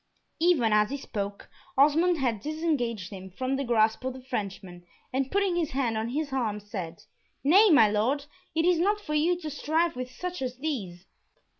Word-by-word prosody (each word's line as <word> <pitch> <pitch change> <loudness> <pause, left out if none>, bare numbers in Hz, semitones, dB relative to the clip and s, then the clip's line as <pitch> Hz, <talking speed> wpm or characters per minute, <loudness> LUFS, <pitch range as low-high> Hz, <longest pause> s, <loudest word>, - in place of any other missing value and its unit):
Even 310 -10 +3
as 210 0 +4
he 280 - -3
spoke 200 -6 -5 0.3
Osmond 320 +5 +4
had 240 -7 -1
disengaged 265 - -2
him 190 -1 -8
from 255 +8 -2
the 275 - -1
grasp 225 -2 +2
of 260 0 -2
the 260 0 -11
Frenchman, 195 -7 -5 0.3
and 265 0 0
putting 395 -3 +1
his 335 -3 0
hand 255 -4 0
on 220 +1 -2
his 285 +2 -3
arm, 225 -6 -1
said, 185 -5 -7 0.4
"Nay, 390 +10 +6
my 285 - +7
Lord, 235 +8 0 0.3
it 325 +1 +2
is 355 -2 +3
not 410 +4 +2
for 300 -7 -5
you 335 +4 +2
to 310 -3 -5
strive 320 +3 0
with 255 0 -5
such 360 +6 -6
as 255 -1 -3
these." 205 - -4
260 Hz, 185 wpm, -27 LUFS, 215-315 Hz, 0.4 s, my